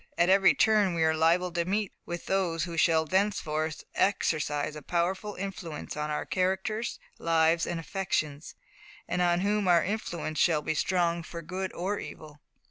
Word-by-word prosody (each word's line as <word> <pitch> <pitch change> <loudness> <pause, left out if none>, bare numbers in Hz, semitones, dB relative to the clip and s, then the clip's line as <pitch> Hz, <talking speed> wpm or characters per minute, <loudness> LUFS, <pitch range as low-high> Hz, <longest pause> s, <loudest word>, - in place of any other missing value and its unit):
At 175 +1 +3
every 195 0 +6
turn 210 -5 +3
we 165 - +1
are 160 0 +3
liable 170 +3 +2
to 170 0 0
meet 200 +3 -1
with 175 0 -5
those 175 -4 0
who 170 0 -4
shall 160 -1 +3
thenceforth 160 -4 -1
exercise 150 -6 0
a 150 - -7
powerful 185 +6 -1
influence 180 -5 -6
on 150 0 -3
our 150 - -2
characters, 190 +5 -1 0.2
lives, 165 0 +2
and 175 - -2
affections, 160 -5 -3 0.5
and 180 - -1
on 175 0 +2
whom 205 0 +1
our 175 -1 +5
influence 175 -7 -3
shall 155 -3 +3
be 155 - 0
strong 170 +1 +1
for 170 +1 -8
good 185 +3 -4
or 195 +4 -2
evil. 150 -1 -10
175 Hz, 165 wpm, -28 LUFS, 160-190 Hz, 0.5 s, every